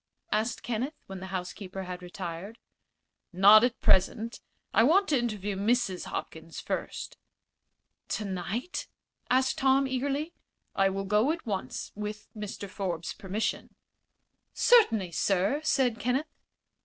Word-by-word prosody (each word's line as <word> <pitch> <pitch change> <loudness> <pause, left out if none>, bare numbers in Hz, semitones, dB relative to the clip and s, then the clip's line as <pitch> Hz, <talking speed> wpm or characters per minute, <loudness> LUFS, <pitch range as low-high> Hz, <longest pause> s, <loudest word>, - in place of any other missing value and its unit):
asked 220 +3 0
Kenneth, 245 +6 -2
when 195 -1 -7
the 190 - -7
housekeeper 185 +1 -5
had 180 -1 -6
retired. 180 +3 -6 0.7
"Not 205 +4 +8
at 245 0 +1
present. 220 +5 +2 0.3
I - - +5
want 350 - +5
to 285 -4 +3
interview 210 -4 -2
Mrs. 205 -2 +1
Hopkins - - -6
first." - - -4 0.9
"Tonight?" 205 - -3 0.4
asked 260 +4 +2
Tom, 270 0 +4
eagerly. 280 +5 -2 0.4
"I 195 0 +4
will 195 +1 -3
go 210 +8 +3
at 330 0 -5
once, 190 - -4
with 210 0 -6
Mr. 210 -1 -6
Forbes's 180 -4 -3
permission." 200 +3 -3 0.8
"Certainly, 225 - +5
sir," 195 - +1
said 260 -7 +2
Kenneth. 255 +5 0
210 Hz, 120 wpm, -29 LUFS, 190-255 Hz, 0.9 s, Not